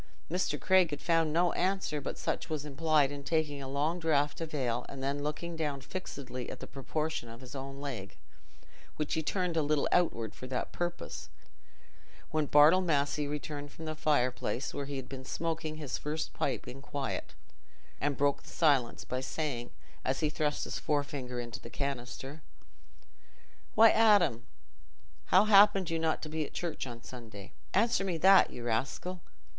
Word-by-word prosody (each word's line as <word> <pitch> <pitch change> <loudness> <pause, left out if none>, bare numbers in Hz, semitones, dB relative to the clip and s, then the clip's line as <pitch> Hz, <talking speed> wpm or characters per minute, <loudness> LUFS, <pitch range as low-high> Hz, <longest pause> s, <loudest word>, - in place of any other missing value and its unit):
Mr. 180 +1 0
Craig 185 -3 +4
had 145 -2 -4
found 165 -2 +2
no 175 +2 +3
answer 185 -5 0
but - - -4
such - - -2
as - - -19
was 155 -2 -2
implied 150 -1 +2
in 140 -1 -6
taking 150 -2 0
a 135 - -5
long 150 +6 0
draught 150 -2 +1
of 160 -1 -4
ale 125 -4 -1
and 135 -1 -7
then 140 +1 -1
looking 150 +3 -3
down 150 -3 -2
fixedly 130 -5 -6
at - - -7
the - - -6
proportions 150 -2 -3
of 115 - -10
his 125 - -10
own 135 0 -6
leg, 120 -9 -6 0.8
which 150 -1 -2
he 160 - +1
turned 180 +1 -1
a 160 - +3
little 150 -1 +2
outward 115 - +2
for 130 - -8
that 130 -1 -3
purpose, 175 0 -4 1.0
when 155 -2 +1
Bartle 150 +6 +7
Massey 145 -3 +1
returned 145 0 -5
from 160 - -9
the 155 - -2
fireplace, 135 -4 0
where 140 - -4
he 140 - -4
had 130 -2 -5
been 130 -1 -7
smoking 160 +2 -3
his 150 -4 -4
first 150 +2 -3
pipe - - -2
in 135 +2 -8
quiet, 140 -2 -4 0.6
and 145 -1 0
broke 140 0 +2
the - - -14
silence 140 -8 +2
by 130 0 -2
saying, 130 -4 -3 0.3
as 130 +4 0
he 155 -1 +1
thrust 150 0 0
his - - -3
forefinger 140 -4 -2
into 120 -2 -5
the 115 - -10
canister, 140 +2 -4 1.3
"Why, 225 0 +8
Adam, 200 - +4 0.8
how 185 - +6
happened 200 -4 +6
you 165 - 0
not 160 -1 0
to 155 - -4
be 155 0 -1
at - - -8
church 165 -6 -3
on 120 -1 -8
Sunday? 110 -6 -10 0.2
Answer 225 0 +3
me 185 -4 -1
that, 190 +3 +7
you 120 - -8
rascal. 140 +10 -2
150 Hz, 175 wpm, -31 LUFS, 135-165 Hz, 1.3 s, Why